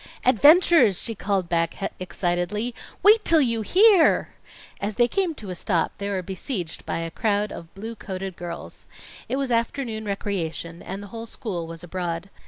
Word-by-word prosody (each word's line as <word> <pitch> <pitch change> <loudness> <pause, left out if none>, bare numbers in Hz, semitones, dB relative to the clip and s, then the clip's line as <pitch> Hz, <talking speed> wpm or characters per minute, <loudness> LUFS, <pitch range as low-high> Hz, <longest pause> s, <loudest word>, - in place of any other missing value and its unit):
"Adventures!" 290 - +6
she 230 - -2
called 195 -3 -1
back 165 -1 0 0.2
excitedly. 185 +5 -2 0.3
"Wait 425 +1 +7
till 330 - +5
you 230 -5 +1
hear!" 380 - +5 0.5
As 205 +1 -3
they 240 -1 +4
came 350 +4 -1
to 205 -7 -8
a - - -5
stop, 175 -1 0
they 200 0 -3
were 190 -2 -2
besieged 185 - -5
by - - -1
a 165 0 -4
crowd 210 +1 0
of 170 -1 -9
blue 220 +4 -6
coated 190 -3 -6
girls. 170 -1 -8 0.4
It - - 0
was 270 -2 -2
afternoon 230 -1 -1
recreation, 170 -4 -3
and 195 +2 -6
the - - -9
whole 230 0 -6
school 180 -8 -5
was 165 0 -8
abroad. 175 +1 -4
200 Hz, 170 wpm, -24 LUFS, 175-235 Hz, 0.5 s, Wait